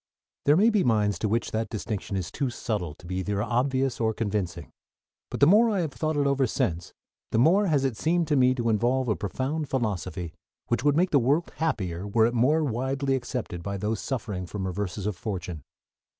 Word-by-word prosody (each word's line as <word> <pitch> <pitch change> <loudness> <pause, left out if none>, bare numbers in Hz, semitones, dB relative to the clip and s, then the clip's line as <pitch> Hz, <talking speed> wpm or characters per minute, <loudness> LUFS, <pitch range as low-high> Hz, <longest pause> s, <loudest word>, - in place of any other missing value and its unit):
There 145 +2 +5
may 220 +5 +5
be 210 -3 +2
minds 105 -5 +2
to 110 - 0
which 115 +2 0
that 110 0 -2
distinction 105 -3 -4
is 90 -3 -4
too 140 -3 -1
subtle 105 -10 -3
to - - -17
be 90 +1 -4
either 100 +2 -1
obvious 130 +2 0
or 110 -1 +1
convincing; 95 -6 -3 0.6
but - - -5
the - - +9
more 215 +8 +6
I 200 -4 +1
have 160 -4 -2
thought 155 +5 -2
it 145 - +2
over 140 -1 +2
since 85 -5 -2 0.4
the - - 0
more 180 - +4
has 145 -5 +2
it 130 -4 0
seemed 165 +6 +1
to 150 - +3
me 130 -1 +4
to 120 -2 0
involve 125 +4 +1
a 105 - +2
profound 135 - -3
philosophy 95 -8 -2 0.4
which 120 +1 0
would 145 0 +3
make 180 +2 +2
the 145 - +5
world 145 +8 +1
happier 95 - -2
were 110 +2 +3
it 120 - +1
more 140 +7 +3
widely 135 +1 -1
accepted 125 -8 -3
by 100 +2 -4
those 105 +2 -2
suffering 105 -9 -4
from 95 0 -4
reverses 95 +1 -3
of 105 -2 -1
fortune. 90 -4 -5
120 Hz, 205 wpm, -26 LUFS, 100-140 Hz, 0.6 s, the